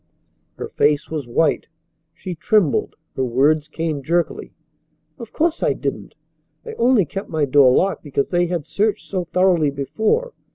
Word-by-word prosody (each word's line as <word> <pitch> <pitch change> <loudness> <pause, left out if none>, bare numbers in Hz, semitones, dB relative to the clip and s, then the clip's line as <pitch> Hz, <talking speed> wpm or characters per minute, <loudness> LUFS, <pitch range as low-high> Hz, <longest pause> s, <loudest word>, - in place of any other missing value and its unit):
Her - - -6
face 145 +1 0
was 150 -5 -4
white. 150 +6 +1 0.5
She 185 - -6
trembled. 180 - +1 0.2
Her 130 - -1
words 145 +5 +2
came 155 -2 -3
jerkily: 170 +5 -1 0.7
"Of 230 -2 -9
course 330 +1 0
I - - +2
didn't. - - -5 0.5
I 455 - -7
only 235 -5 +4
kept 195 +6 -6
my 155 -2 0
door 135 -1 +5
locked 195 +9 +1
because 140 -2 -2
they 175 -1 +2
had 170 -4 -3
searched 210 +1 -1
so 185 -3 -3
thoroughly 175 -3 +2
before. 220 - -1
165 Hz, 155 wpm, -20 LUFS, 145-195 Hz, 0.7 s, door